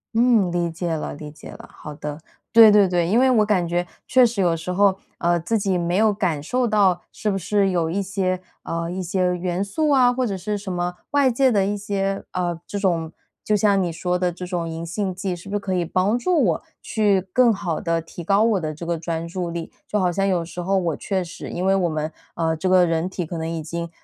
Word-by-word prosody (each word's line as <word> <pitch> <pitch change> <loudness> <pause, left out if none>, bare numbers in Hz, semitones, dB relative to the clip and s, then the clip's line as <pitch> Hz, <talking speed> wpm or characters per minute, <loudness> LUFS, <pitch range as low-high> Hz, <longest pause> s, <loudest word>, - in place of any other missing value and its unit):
嗯， 230 -6 +4
理 175 -1 0
解 165 0 -3
了 155 - -4
理 150 0 -9
解 155 - -12
了。 - - -11
好 150 - -9
的， 150 0 -6 0.3
对 225 -1 +9
对 205 -2 +6
对， 175 -2 +1
因 215 +7 +3
为 260 0 +4
我 220 -4 +4
感 190 -5 +1
觉 175 +1 -1 0.2
确 255 0 +5
实 230 -4 +2
有 175 -2 +2
时 165 +2 -5
候， 195 +1 +3 0.2
呃， 175 0 +1
自 175 +7 0
己 195 -2 0
没 175 +1 0
有 215 0 +4
感 175 -7 -1
受 250 +9 0
到， 200 -5 +3
是 210 - -2
不 195 - -1
是 200 +1 +1
有 170 -3 0
一 185 +5 -1
些 190 -2 -1 0.2
呃， 170 0 -3
一 185 +1 -3
些 180 0 0
元 180 +1 -2
素 300 +10 -1
啊 255 -3 +5
或 255 0 0
者 195 -3 -3
是 210 +3 -3
什 200 -2 -5
么 175 0 -2
外 285 -3 +3
界 260 +2 +3
的 200 -4 +2
一 205 +1 -1
些， 195 -1 -2
呃， 175 -2 -2
这 205 - -4
种 170 -5 0 0.3
就 215 - +1
像 200 -1 +3
你 175 -2 -1
说 180 +2 -1
的 180 -1 +1
这 180 +1 -7
种 175 -2 -3
银 165 +1 -5
杏 190 +3 -2
剂， 190 -1 -3
是 175 +3 -11
不 205 - -3
是 - - +1
可 195 -1 -3
以 180 -1 +1
帮 185 +6 +1
助 305 +5 +2
我 170 -7 +1 0.2
去 210 -3 +1
更 250 -1 +5
好 175 -6 -2
地 165 0 0
提 165 +1 -9
高 200 +5 +3
我 225 -4 +2
的 155 -3 -3
这 155 +3 -8
个 170 -1 -2
专 165 0 -3
注 175 0 -4
力？ 170 -1 -5 0.2
就 210 - 0
好 180 -2 +2
像 195 +3 0
有 180 -3 0
时 175 +1 -7
候 195 +2 +1
我 170 -5 0
确 190 -2 -2
实， 170 0 -8
因 180 - -3
为 195 - +4
我 180 -3 +1
们， 155 0 -3 0.2
呃， 165 -1 0
这 185 +4 -1
个 185 -1 +5
人 165 +1 0
体 185 -2 -4
可 165 +1 -5
能 160 0 -3
已 165 -1 -3
经 170 +2 -5
185 Hz, 270 characters per minute, -22 LUFS, 170-205 Hz, 0.3 s, 对